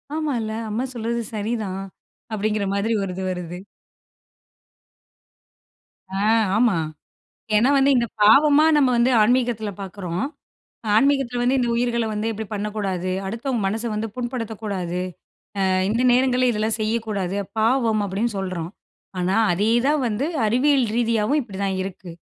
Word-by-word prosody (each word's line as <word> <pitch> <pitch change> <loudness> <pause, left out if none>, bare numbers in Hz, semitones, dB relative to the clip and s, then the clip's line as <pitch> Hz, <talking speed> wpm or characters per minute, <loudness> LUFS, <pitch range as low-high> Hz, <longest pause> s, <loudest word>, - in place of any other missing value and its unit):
''ஆமால்ல, 245 -9 -2 0.2
அம்மா 225 +4 -1
சொல்றது 235 0 -2 0.2
சரிதான்'' 200 -3 -3 0.4
அப்டிங்கிற 210 -1 -1
மாரி 215 +3 0
ஒரு 190 - -3
இது 190 - -4
வருது. 180 0 -6 2.6
ஆ - - -1 0.4
ஆமா. 225 -6 +3 0.8
ஏன்னா 245 +6 +4
வந்து 275 +1 +4
இந்த 235 -1 +2 0.2
பாவமா 290 +7 +6
நம்ம 275 -3 +4
வந்து 240 +2 +3
ஆன்மீகத்தில 235 -2 +1
பார்க்குறோம். 185 +1 -4 0.7
ஆன்மீகத்தில 270 -1 +2
வந்து 255 +2 +2
"இந்த 240 - +1
உயிர்கள 235 -1 0
வந்து 210 +1 -2
இப்படி 220 -1 -5
பண்ணக்கூடாது, 200 -3 -2 0.2
அடுத்தவங்க 230 +4 -2
மனச 220 +4 -1
வந்து 215 +1 -2
புண்படுத்தக்கூடாது, 220 -7 -4 0.7
அ - - +2 0.2
இந்த 230 +4 +1
நேரங்களில 255 0 +3
இதெல்லாம் 220 +1 -1
செய்யக்கூடாது 215 -4 -1 0.2
பாவம்" 225 -1 +2
அப்டின்னு 210 +4 -2
சொல்றோம். 180 -3 -4 0.5
ஆனா 185 +3 +1 0.2
அதேதான் 235 - +2
வந்து 230 +6 -1 0.2
அறிவியல 260 +3 +3
ரீதியாவும் 230 +4 +1
இப்படி 200 -5 -9
தான் 195 -1 -1
இருக்கு. 185 -2 -7
220 Hz, 125 wpm, -22 LUFS, 200-245 Hz, 2.6 s, பாவமா